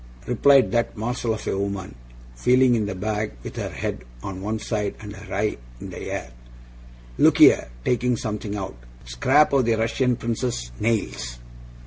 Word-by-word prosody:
replied 135 +3 +5
that 120 -1 0
morsel 115 0 -1
of 110 - -8
a - - 0
woman, 100 -1 -3 0.4
feeling 125 - +4
in 110 -3 +1
the 100 - -4
bag 105 +2 -2
with - - -7
her - - -3
head - - -4 0.2
on 95 -1 -5
one 110 +3 -2
side 105 -2 -2
and 105 -1 -8
her 95 -1 -12
eye 105 +2 0 0.2
in - - -8
the - - -7
air. 65 - -4 0.9
'Look - - +5
here!' - - +7 0.2
taking 125 0 +1
something 105 -1 -4
out. 95 -2 -4 0.3
'Scraps 130 - +3
of 135 -3 +4
the 115 -1 +3
Russian 120 +3 +1
Prince's 115 - -3
nails. 60 - -1
110 Hz, 165 wpm, -24 LUFS, 100-120 Hz, 0.9 s, here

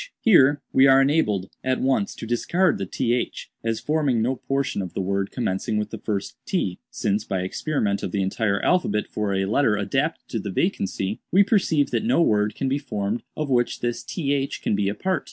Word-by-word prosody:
"Here 145 - +5
we 135 +1 +6
are 135 0 +7
enabled, 105 - +1
at 130 0 0
once, 130 -6 0
to - - -7
discard 170 +11 +1
the 95 - -3
'th,' 120 +5 -2
as 115 -1 -1
forming 150 -6 +1
no 125 +4 +1
portion 135 -5 -1
of 90 -2 -7
the - - -2
word 100 +1 -1
commencing 105 -2 -2
with 105 0 -2
the 110 - -6
first 100 -2 -3
t; 100 - -2
since, 105 +1 -1
by 95 -4 -2
experiment 100 - -1
of 90 - -3
the 100 0 0
entire 100 +1 0
alphabet 105 - +2
for 105 -2 -2
a 95 0 +1
letter 110 +1 +2
adapted 135 +10 -1
to 115 - -2
the 100 - -5
vacancy, 95 - -1
we 195 +3 +6
perceive 185 -8 +2
that - - 0
no 225 -5 +2
word 105 -9 +2
can 135 - -2
be 135 +2 0
formed 105 -5 -3 0.2
of 150 -3 -2
which 120 -1 +1
this 120 -1 -2
th 140 -4 -2
can - - 0
be 100 -1 +1
a 100 - -3
part. 190 -1 0
115 Hz, 205 wpm, -24 LUFS, 100-140 Hz, 0.2 s, are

